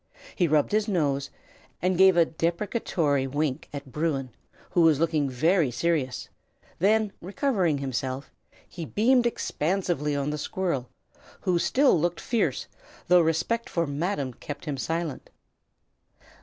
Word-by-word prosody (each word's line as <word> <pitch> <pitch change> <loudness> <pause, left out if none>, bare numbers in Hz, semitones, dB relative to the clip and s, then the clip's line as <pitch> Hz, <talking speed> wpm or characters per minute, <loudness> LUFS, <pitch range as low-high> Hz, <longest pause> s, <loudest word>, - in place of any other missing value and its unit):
He 175 - +2
rubbed 150 -1 +2
his 210 +1 +1
nose, 140 -8 0 0.5
and 180 +2 +1
gave 190 0 +6
a 170 - +6
deprecatory 165 - -1
wink 145 +1 -2
at 140 -2 -8
Bruin, 135 -3 -1 0.4
who 175 - +3
was 160 -3 +5
looking 155 -4 +1
very 160 +4 +2
serious; 130 0 -1 0.5
then, 210 +3 +3
recovering 190 - 0
himself, 135 0 -3 0.4
he 170 - -7
beamed 240 - +3
expansively 170 - -1
on 140 +1 -1
the 150 - -3
squirrel, 150 -7 -2 0.5
who 180 -2 +1
still 265 - +3
looked 175 +1 0
fierce, 235 -2 0 0.4
though 180 0 +7
respect 165 +9 0
for 170 -3 0
"Madam" 145 -2 -2
kept 145 +6 -8
him 150 -3 -2
silent. 160 +2 -3
165 Hz, 130 wpm, -26 LUFS, 140-185 Hz, 0.5 s, though